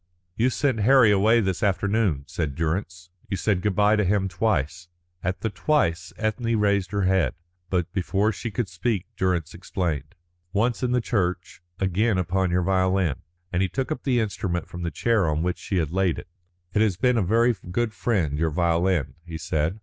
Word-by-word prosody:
"You 120 +3 +2
sent 130 -2 0
Harry 120 0 +6
away 110 +4 +4
this 95 -3 -1
afternoon," 100 -6 +1
said 75 -2 -3
Durrance. 85 +2 -3 0.2
"You 95 - -1
said 100 -3 +1
good 105 -1 0
bye 105 +2 +4
to 105 - +2
him 95 0 +1
twice." 90 -4 -1 0.4
At 90 +2 -2
the 110 - -1
"twice" 90 - 0
Ethne 115 +1 -1
raised 100 -3 +2
her 100 0 -1
head, 95 -1 +2 0.3
but 90 -3 -1
before 100 +2 +1
she 120 - -5
could 115 +1 -2
speak 95 +2 -2
Durrance 90 -4 0
explained: 85 -5 -3 0.4
"Once 115 +3 +1
in 125 -1 0
the 125 0 +2
church, 90 -6 -2 0.2
again 95 +3 +1
upon 95 +1 0
your 90 +1 +1
violin," 95 -4 +1 0.4
and 90 - +1
he 95 - +1
took 135 +5 -3
up 125 - -2
the 125 -3 +2
instrument 95 -5 -2
from 85 - -8
the 85 - -1
chair 110 -3 +1
on 75 +1 0
which 90 0 -1
she 95 - -2
had 80 -3 0
laid 95 -2 +1
it. - - -8 0.5
"It 105 - +2
has 105 -5 +2
been 125 +2 +2
a - - +2
very 115 +5 +3
good 110 +4 -1
friend, 85 -14 0
your 80 0 +2
violin," 85 -1 +1
he 85 -2 -7
said. 80 +3 -1
95 Hz, 190 wpm, -25 LUFS, 85-110 Hz, 0.5 s, Harry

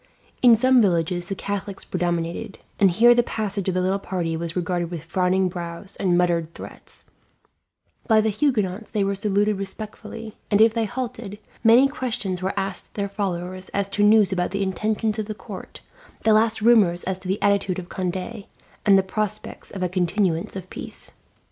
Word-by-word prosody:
In 240 -2 +8
some 255 +2 +5
villages 175 -2 +1
the 195 - -2
Catholics 200 0 -5
predominated, 175 +4 -2 0.2
and 195 - +6
here 235 +7 +6
the 240 - +4
passage 210 -4 -3
of 185 - -1
the 185 - +2
little 190 +2 +1
party 175 -4 -2
was 165 0 -4
regarded 175 -1 -1
with 170 -3 -6
frowning 185 +2 +1
brows 175 +2 -6
and 180 -3 +1
muttered 170 -2 +1
threats; - - -11 1.0
by 220 -2 +5
the 215 0 +2
Huguenots 210 -5 0
they 210 -3 0
were 195 0 0
saluted 205 0 +1
respectfully, 210 +2 -7 0.2
and 205 - +3
if 220 0 +6
they 230 -1 0
halted, 240 -3 -5 0.3
many 240 +4 +7
questions 220 -9 -3
were 190 +2 -2
asked 195 -2 -4
their 200 -1 -2
followers 185 -2 -4
as 200 0 +1
to 200 +1 -1
news 210 -1 +5
about 180 -1 0
the 200 +1 -1
intentions 215 +3 -1
of 215 - -3
the 215 - -4
court, - - -10 0.4
the 220 - +5
last 220 0 +2
rumours 205 -7 +4
as 190 0 -3
to 185 - -9
the 190 +2 0
attitude 200 -2 +1
of 180 -1 -7
Conde, 185 0 -2 0.7
and 195 -1 +6
the 190 - +3
prospects 210 +2 -4
of 190 -2 -5
a - - +2
continuance 180 +1 0
of 185 -1 -6
peace. - - -7
195 Hz, 180 wpm, -23 LUFS, 180-215 Hz, 1.0 s, In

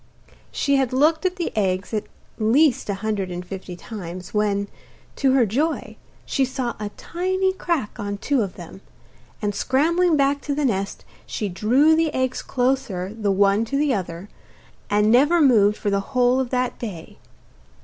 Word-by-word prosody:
She 280 -1 +1
had 265 -2 0
looked 315 +6 +3
at 365 - -4
the 350 -3 -4
eggs 190 -1 -1
at 215 - -1 0.3
least 245 +3 +3
a 200 - 0
hundred 200 -4 -1
and 180 0 -6
fifty 185 -1 -7
times, 180 -2 -8
when, 205 -1 +1 0.5
to 270 -2 +3
her 260 -3 +4
joy, 290 +10 -1 0.3
she 270 - 0
saw 260 -2 -2
a 210 -1 -4
tiny 375 +2 -1
crack 335 - -2
on 205 -1 -3
two 275 +4 0
of 195 -4 -3
them, 175 +2 -11 0.6
and 205 0 0
scrambling 320 - +2
back 280 0 +2
to 285 - -2
the 295 0 0
nest 200 -5 -2 0.2
she 210 - -3
drew 255 - +3
the 320 -1 +1
eggs 260 0 -1
closer 245 -8 -1
the 210 -3 -1
one 200 +2 +3
to 275 +5 -2
the 290 -1 +2
other, 180 -2 -4 0.6
and 210 +1 +3
never 290 +8 +5
moved 215 -8 +4
for 205 - -2
the 200 - +2
whole 250 +4 +2
of 260 -2 -1
that 250 0 -1
day. 190 -9 -8
240 Hz, 170 wpm, -22 LUFS, 200-280 Hz, 0.6 s, never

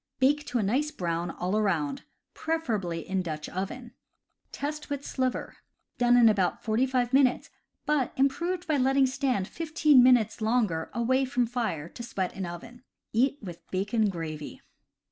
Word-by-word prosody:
Bake 290 +3 +2
to 245 - -1
a 225 - +1
nice 260 +10 +1
brown 170 - -3
all 180 +3 -2
around, 200 - 0 0.3
preferably 215 - -2
in 190 0 0
Dutch 155 -3 -5
oven. 230 +6 -5 0.6
Test 300 +1 -5
with 285 -1 -4
sliver. 255 -1 -2 0.4
Done 245 0 +5
in 235 -2 +7
about 195 -5 +1
forty 230 +4 +1
five 250 -1 0
minutes, 265 -2 +3 0.3
but 295 -4 +1
improved 340 +7 0
by 305 -2 +2
letting 270 +1 +3
stand 260 -7 -1
fifteen 305 -3 +3
minutes 245 -4 +4
longer, 215 -8 0
away 255 +3 +1
from 255 -2 +1
fire, 225 -11 -3
to 240 - -10
sweat 195 -6 -3
in 190 -2 -4
oven. 200 +8 -9 0.3
Eat 265 +5 +2
with 175 -4 -10
bacon 205 +3 0
gravy. 155 -4 -6
240 Hz, 155 wpm, -28 LUFS, 190-270 Hz, 0.6 s, in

